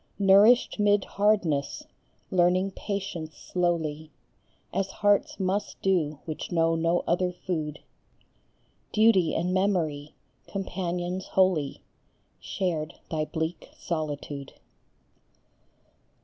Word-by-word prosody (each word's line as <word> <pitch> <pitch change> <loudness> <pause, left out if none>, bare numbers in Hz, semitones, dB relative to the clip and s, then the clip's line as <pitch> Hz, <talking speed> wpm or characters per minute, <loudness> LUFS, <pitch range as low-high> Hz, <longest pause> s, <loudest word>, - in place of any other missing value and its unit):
Nourished 205 +5 +5
mid 205 -1 +3
hardness, 185 -9 +1 0.5
learning 185 +2 +3
patience 185 -6 -5
slowly 160 -4 -1 0.6
As 195 +1 0
hearts 205 +1 +1
must 195 +2 -1
do 165 -6 +1
which 155 -2 -5
know 165 -1 +3
no 165 +1 +1
other 180 +1 +1
food, 160 -4 -4 1.1
Duty 215 -6 +4
and 180 +2 0
Memory, 165 -7 0 0.3
companions 180 -1 -3
holy, 180 -7 +1 0.6
Shared 165 -4 -2 0.2
thy 155 -1 0
bleak 160 +3 -4
solitude. 145 -4 -4
CHARLOTTE - - -28
BRONTE. - - -39
175 Hz, 95 wpm, -27 LUFS, 155-195 Hz, 1.1 s, Nourished